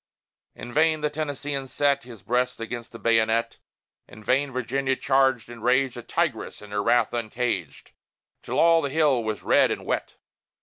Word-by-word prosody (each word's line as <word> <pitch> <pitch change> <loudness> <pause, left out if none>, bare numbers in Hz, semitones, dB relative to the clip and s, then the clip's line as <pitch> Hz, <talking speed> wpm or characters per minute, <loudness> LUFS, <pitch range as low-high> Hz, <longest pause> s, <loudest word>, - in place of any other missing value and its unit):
In 120 - -9
vain 155 0 +3
the 150 0 0
Tennesseean 145 -2 -4
set 140 -1 +1
His 115 -6 -12
breast 125 +4 0
against 115 +1 -6
the 115 - -9
bayonet; 115 0 +1 0.5
In 110 - -14
vain 135 +4 +1
Virginia 130 +2 -1
charged 130 -2 +2
and 120 -2 -11
raged, 130 +1 +2
A 120 - -6
tigress 150 0 -2
in 105 -1 -13
her 105 0 0
wrath 120 +2 +2
uncaged, 115 - -3 0.5
Till - - -4
all 165 0 +5
the 140 - -2
hill 140 -5 +2
was 110 -2 -4
red - - +4
and - - -4
wet! - - -2
125 Hz, 170 wpm, -25 LUFS, 115-140 Hz, 0.5 s, all